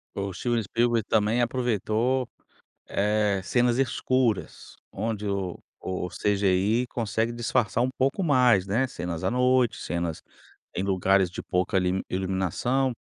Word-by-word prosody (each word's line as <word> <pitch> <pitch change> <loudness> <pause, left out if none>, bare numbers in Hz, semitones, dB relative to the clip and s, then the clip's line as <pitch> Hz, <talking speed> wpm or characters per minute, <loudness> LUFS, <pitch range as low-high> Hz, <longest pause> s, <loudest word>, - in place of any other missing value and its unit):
O 100 -1 -3
Steven 120 +3 -1
Spielberg 115 +2 +1
também 110 +2 +2
aproveitou, 120 +1 0 0.6
eh, 105 -1 +1
cenas 120 +4 +2
escuras, 130 -4 -1 0.2
onde 105 0 -3
o 95 -3 -2 0.2
o 90 -1 -3
CGI 100 +4 +1
consegue 115 0 -1
disfarçar 120 -2 0
um 125 - +2
pouco 135 +8 +1
mais, 125 - +4
né? 115 +7 +1
Cenas 90 -8 -5
à - - +2
noite, 125 -1 +2
cenas 85 -2 -3 0.5
em 95 - -2
lugares 95 -1 +2
de - - -7
pouca 90 +1 0
limi 90 +1 +1
iluminação. 95 +8 0
110 Hz, 130 wpm, -26 LUFS, 95-120 Hz, 0.6 s, mais